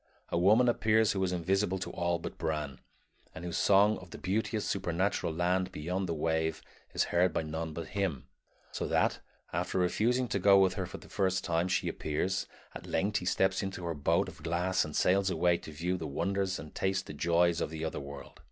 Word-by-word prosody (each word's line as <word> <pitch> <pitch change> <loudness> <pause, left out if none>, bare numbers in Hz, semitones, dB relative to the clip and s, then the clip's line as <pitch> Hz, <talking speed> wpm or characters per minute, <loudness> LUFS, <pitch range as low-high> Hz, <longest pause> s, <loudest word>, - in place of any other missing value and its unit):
A - - 0
woman 110 +7 +5
appears 110 -2 +3
who 95 -1 -1
is 90 - 0
invisible 95 +2 0
to 95 - -5
all 85 0 0
but 85 - -8
Bran, 75 -5 -2 0.6
and 80 - -7
whose 85 - -2
song 100 +2 +4
of 90 - -13
the - - -9
beauteous 105 +2 -1
supernatural 90 -1 0
land 90 +3 0
beyond 90 +4 -3
the 85 - -1
wave 80 0 0 0.4
is - - +3
heard 90 +1 +4
by - - 0
none 80 +1 -4
but 85 +1 -6
him; 95 -10 -2 0.4
so - - -3
that, - - +1 0.3
after - - -1
refusing 115 +8 +2
to 100 - 0
go 100 +1 +6
with 95 -1 +4
her 95 -2 -3
the - - -10
first 95 -1 0
time 85 0 +1
she 90 - 0
appears, 90 +6 -1 0.3
at - - -9
length 100 +5 0
he 90 - -4
steps 95 +1 +2
into 95 -3 -4
her 85 - -1
boat 75 -2 +1
of - - -11
glass 85 +4 +1
and 75 -1 -6
sails 95 +1 +3
away 85 0 +3
to 80 - -10
view 85 +4 -2
the 80 - -5
wonders 95 +6 -1
and 75 - -9
taste 95 0 -1
the - - -8
joys 85 0 +2
of - - -1
the 80 0 -4
other 80 - -3
world. 70 -1 -9
90 Hz, 205 wpm, -31 LUFS, 80-95 Hz, 0.6 s, go